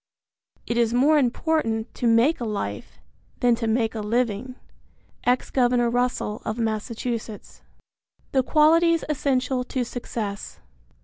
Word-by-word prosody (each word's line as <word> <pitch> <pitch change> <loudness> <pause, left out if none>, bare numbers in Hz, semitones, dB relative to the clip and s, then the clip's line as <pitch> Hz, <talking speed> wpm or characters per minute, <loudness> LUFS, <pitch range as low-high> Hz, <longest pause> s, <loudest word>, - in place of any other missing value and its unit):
It 235 - -2
is 235 0 +2
more 295 +5 +4
important 245 -4 0
to 240 - -1
make 235 +8 +4
a - - -4
life 210 -3 -4 0.4
than 245 -2 +4
to 230 0 -2
make 225 0 +1
a 225 - -4
living. 235 +2 -1 0.7
Ex 250 +1 +1
Governor 245 -2 +2
Russell 245 -3 -1
of 215 - -3
Massachusetts. 225 0 -4
I. - - -36 0.5
THE 265 -1 +2
QUALITIES 330 +4 +4
ESSENTIAL 260 -3 0
TO 255 0 -2
SUCCESS. 220 -4 -5
245 Hz, 130 wpm, -24 LUFS, 225-260 Hz, 0.7 s, more